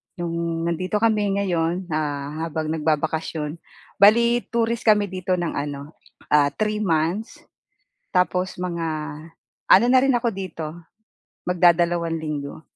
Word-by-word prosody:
'yong 170 -1 -3
nandito 185 +5 -2
kami 210 -3 +2
ngayon, 175 -1 0
ah, 150 +1 -2
habang 155 -1 -3
nagbabakasyon, 155 0 -2 0.4
bale 235 +4 +5
tourist 235 0 -1
kami 210 -3 +4
dito 185 0 -1
ng 175 -2 -2
ano, 145 +1 -5 0.4
ah, 150 -1 +5
3 215 0 -1
months. 175 +3 -1 0.7
Tapos 180 0 0
mga 170 -2 -3 0.8
ano 195 +6 +7
na 260 - +7
rin 270 -1 +3
ako 240 0 +1
dito, 165 -5 -5 0.8
magdadalawang 175 -1 +2
linggo. 150 0 -5
175 Hz, 120 wpm, -23 LUFS, 160-200 Hz, 0.8 s, ano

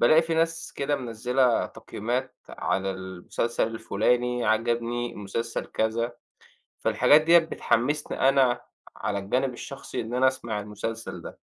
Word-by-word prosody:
بالاقي 155 +7 +6
في 165 0 -2
ناس 165 +1 0
كده 145 +1 0
مِنَزِّلة 125 0 +1
تقييمات 125 +5 -4
على 95 0 -1
المسلسل 95 +5 -2
الفلاني، 120 +2 0
عجبني 120 +2 0
مسلسل 115 +3 -3
كذا. 115 +2 -1 0.7
فالحاجات 150 - +5
ديّة 170 +2 +7
بتحمسني 145 -4 +1
أنا 130 -3 +4 0.4
على 100 - -2
الجانب 125 +7 0
الشخصي 135 +3 -6
إن 115 +2 -5
أنا 130 +1 +5
أسمَع 115 -5 -3
المسلسل 105 +2 -5
ده. - - -9
120 Hz, 125 wpm, -26 LUFS, 110-130 Hz, 0.7 s, ديّة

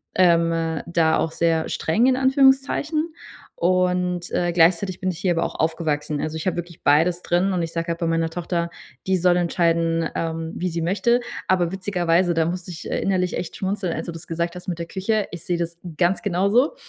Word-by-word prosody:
ähm, 165 -3 +2
da 165 -2 +2
auch 160 - -1
sehr 165 -1 +1
streng 215 +10 +1
in 260 - +4
Anführungszeichen 275 +4 +2 0.5
und, 180 0 +1
äh, 175 0 0
gleichzeitig 175 +2 +3
bin 185 - -1
ich 165 - -8
hier 185 - +1
aber 165 0 +1
auch - - -4
aufgewachsen. 155 -2 -1
Also, 155 +1 -3
ich 160 - -6
hab 185 - +1
wirklich 170 -1 -7
beides 165 +5 +3
drin 180 +3 +1
und 180 - 0
ich 165 - -4
sage 165 0 -2
halt 170 0 -2
bei 170 - -1
meiner 165 0 +1
Tochter, 170 0 -2 0.4
die 190 - +3
soll 180 0 +3
entscheiden, 165 -1 +1
ähm, 165 0 -3
wie 180 0 -2
sie 170 0 -3
möchte, 205 +8 +2 0.3
aber 180 -2 +2
witzigerweise 180 -2 +1
da 165 -1 +2
musste 180 +1 -4
ich, 165 - -8
äh, - - -1
innerlich 185 -2 0
echt 180 - -5
schmunzeln, 190 -3 -2
als - - -4
du - - -3
das 165 0 -10
gesagt 170 +1 -2
hast 180 - -10
mit 175 -3 -2
der 170 - -3
Küche. 200 +3 -1
Ich 175 - -8
sehe 175 -1 -1
das 170 0 -3 0.2
ganz 180 +1 +2
genauso. 205 - +2
175 Hz, 205 wpm, -23 LUFS, 165-185 Hz, 0.5 s, in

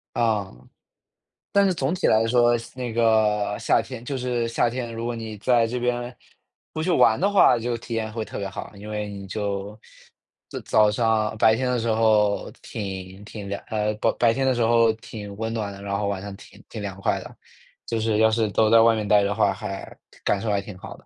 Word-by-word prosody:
啊， 110 -5 0 1.0
但 200 0 +4
是 190 - +2
总 150 -1 -1
体 185 - 0
来 110 +1 +4
说， 120 0 +4
夏 115 - -10
那 125 -2 -4
个 110 -3 +2
夏 - - +3
天 125 -3 -9
就 135 +1 -4
是 125 -2 -1
夏 115 +1 +1
天， 120 -1 -4
如 115 +1 -4
果 120 - -2
你 110 -2 -6
在 115 +1 +2
这 125 +2 -3
边 120 0 -2 0.6
不 155 - -3
去 180 - -1
玩 115 -9 +4
的 195 +4 +2
话， 190 -11 +5
就 120 +1 -2
体 115 0 -8
验 110 -1 -2
会 110 0 -4
特 - - -7
别 100 -1 -3
好， - - -8
因 105 +1 -10
为 105 -1 -3
你 100 -1 -8
就 100 +1 -4 0.7
就 - - -5
早 105 -1 +3
上， 110 0 +1
啊， - - -7
白 110 0 +5
天 130 +1 -1
的 125 - +1
时 115 - -2
候 110 -2 +2
挺 95 -1 -6
挺 105 -1 -8
凉 100 0 -4
呃， 105 -1 -1
不 105 - +1
白 115 -2 +3
天 135 +2 0
的 130 - +2
时 120 - -1
候 115 0 +4
挺 105 -2 -9
温 110 0 -3
暖 105 -3 -3
的， 100 - -10
然 100 0 -2
后 100 0 -1
晚 100 -1 -2
上 100 0 -7
挺 100 0 -16
挺 110 - -7
凉 95 -1 -6
快 - - 0
的。 - - -11 0.5
就 115 -1 -2
是 110 -1 +1
要 110 0 +5
是 110 -1 +1
都 110 +2 +3
在 115 0 +7
外 115 0 +5
面 105 -1 -3
呆 105 0 +5
的 100 0 0
话， 100 - +2
还 95 0 -7 0.3
感 100 - +1
受 110 - -2
还 100 - +1
挺 100 -1 -10
好 - - -10
的。 - - -22
110 Hz, 250 characters per minute, -24 LUFS, 105-120 Hz, 1.0 s, 在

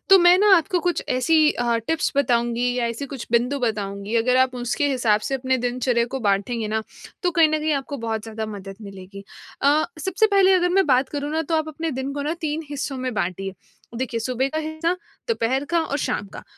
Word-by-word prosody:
तो 385 - +10
मैं 350 +1 +7
ना 410 -1 +6
आपको 355 +1 0
कुछ 355 0 -1
ऐसी 255 +6 +2
अ, 240 -1 0
टिप्स 325 -1 0
बताऊँगी 240 -2 +1
या 240 -2 0
ऐसी 235 +4 -4
कुछ 270 -3 -7
बिंदु 250 +4 +2
बताऊँगी, 205 -3 -3
अगर 250 +3 +3
आप 260 0 +3
उसके 245 +4 -1
हिसाब 235 -6 +2
से 270 - -3
अपने 260 0 0
दिनचर्या 245 -1 +1
को 265 - -2
बाँटेंगे 210 +2 0
ना, 220 0 -1 0.4
तो 355 - +2
कहीं 330 -3 +4
न 310 0 0
कहीं 310 0 0
आपको 280 0 -3
बहुत 225 -2 -3
ज़्यादा 220 -1 -5
मदद 195 -2 -8
मिलेगी। 195 0 -10 0.4
अ, 295 +3 +4
सबसे 380 +7 +2
पहले 395 -2 +4
अगर 360 -1 +3
मैं 385 -1 +3
बात 260 -1 +3
करूँ 290 0 -4
ना, 320 +1 0
तो 325 +2 -2
आप 315 0 -1
अपने 320 +1 -4
दिन 265 +1 -4
को 285 0 -3
ना, 310 +3 -1
3 310 0 -2
हिस्सों 275 -1 -3
में 255 -1 -3
बाँटिए। 195 0 -2 0.5
देखिए, 235 -3 -2
सुबह 255 +3 -1
का 310 - -3
हिस्सा, 315 +2 -1 0.4
दोपहर 265 - 0
का 340 -1 +3
और 285 - -2
शाम 205 - -2
का। - - -8
260 Hz, 215 wpm, -23 LUFS, 230-315 Hz, 0.5 s, तो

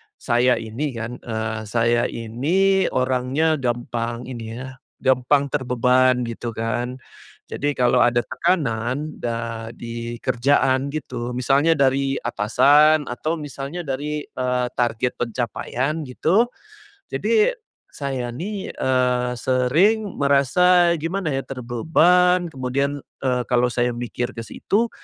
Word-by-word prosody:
saya 120 0 +2
ini 120 +5 -4
kan, 115 +2 -5
eee, 110 -1 -3
saya 120 +1 +2
ini 175 - +1
orangnya 130 +5 +1
gampang 120 -1 -2
ini 115 -3 -7
ya, 130 +1 -9 0.2
gampang 130 +2 +2
terbeban 125 -1 +2
gitu 115 -1 -5
kan, 120 +3 -2 0.6
jadi 145 0 -1
kalau 125 -1 +3
ada 120 -1 +3
tekanan 130 0 -1
da 115 -1 -4
di 115 0 -6
kerjaan 130 +1 +2
gitu, 125 -5 -5
misalnya 140 +6 +3
dari 135 -1 +2
atasan 145 +7 +4
atau 155 +7 -2
misalnya 145 +2 -6
dari, 150 +1 -3
eee, 125 -1 -1
target 120 0 0
pencapaian 125 +5 -2
gitu, 185 - +2 0.6
jadi 460 +2 +2 0.4
saya 130 -4 -4
nih, 195 +6 -5
eee, 125 -1 +1
sering 165 - +2
merasa 170 +5 +4
gimana 165 +2 -2
ya 135 -1 -2
terbebani, 165 +8 +2
kemudian, 140 +1 -2 0.2
eee, 125 -2 +1
kalau 125 0 +2
saya 120 0 0
mikir 120 0 -4
ke 115 - -5
situ, 210 - -1
130 Hz, 115 wpm, -22 LUFS, 120-150 Hz, 0.6 s, atasan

